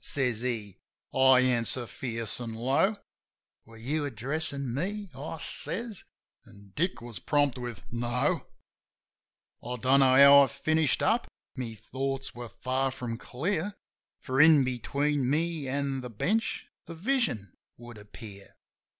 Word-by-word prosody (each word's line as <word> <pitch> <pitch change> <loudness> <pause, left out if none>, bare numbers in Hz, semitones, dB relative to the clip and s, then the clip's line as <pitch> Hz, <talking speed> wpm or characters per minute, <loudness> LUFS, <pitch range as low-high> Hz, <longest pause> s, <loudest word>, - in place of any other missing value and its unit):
says 125 -5 0
he. 115 -6 -3 0.3
I 130 -1 +6
answer 125 -1 +1
fierce 115 -1 -5
an' 115 -2 -5
low: 140 - +2 0.7
"Were 115 0 -15
you 145 +7 -2
addressin' 140 +1 -2
me 195 +7 -3
?" - - -20
I 150 +4 -6
says; 220 +6 -5 0.4
an' 100 -1 -17
Dick 175 -5 -1
was 115 -5 -6
prompt 145 - +1
with 120 -4 -6
"No 120 +1 0 0.6
!" - - -44
I 125 - -4
don't 130 +3 +3
know 130 -1 +5
how 140 +1 +9
I 140 - +4
finished 155 +2 +1
up; 230 +2 +2 0.3
my 120 -4 -5
thoughts 135 +4 -4
were 120 -1 -8
far 130 +3 -1
from 120 -3 -5
clear; 175 +8 -2 0.4
For, 130 +2 +1
in 155 -2 +7
between 140 +2 0
me 160 0 0
an' 135 0 -1
the 125 - -7
bench, 210 - -1 0.2
that 165 - -7
vision 180 - -1 0.2
would 120 -2 -11
appear. 105 -1 -12
130 Hz, 140 wpm, -29 LUFS, 120-150 Hz, 0.7 s, how